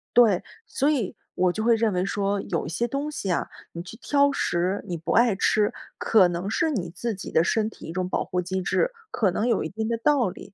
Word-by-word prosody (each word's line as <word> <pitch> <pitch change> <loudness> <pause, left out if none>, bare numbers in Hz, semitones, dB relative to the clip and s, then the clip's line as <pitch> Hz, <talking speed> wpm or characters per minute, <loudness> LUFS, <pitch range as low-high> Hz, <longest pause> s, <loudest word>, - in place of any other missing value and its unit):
对， 220 -7 +5 0.2
所 280 +2 +1
以 255 -11 0 0.2
我 180 0 +3
就 215 - -3
会 230 0 +5
认 225 -3 +1
为 180 0 +1
说， 200 0 -1
有 170 - -2
一 - - -5
些 235 +8 -1
东 280 +4 -3
西 195 -10 -3
啊， - - 0 0.2
你 170 - -6
去 185 +5 -10
挑 280 +3 +2
食、 180 -4 -1
你 175 - -3
不 165 +1 -4
爱 235 -3 +4
吃， 210 +2 +2 0.2
可 200 -5 +5
能 175 +3 -3
是 320 +8 +1
你 180 -10 -2
自 225 +5 -4
己 185 - -8
的 160 - +4
身 215 +3 +1
体 - - -13
一 - - -6
种 185 0 -2
保 - - 0
护 180 - -1
机 185 +1 -3
制， - - +1 0.2
可 200 -5 +1
能 215 +6 -1
有 240 - +2
一 160 - -4
定 220 +4 -3
的 230 - 0
道 250 -2 +2
理， 195 - -11
205 Hz, 260 characters per minute, -25 LUFS, 180-235 Hz, 0.2 s, 对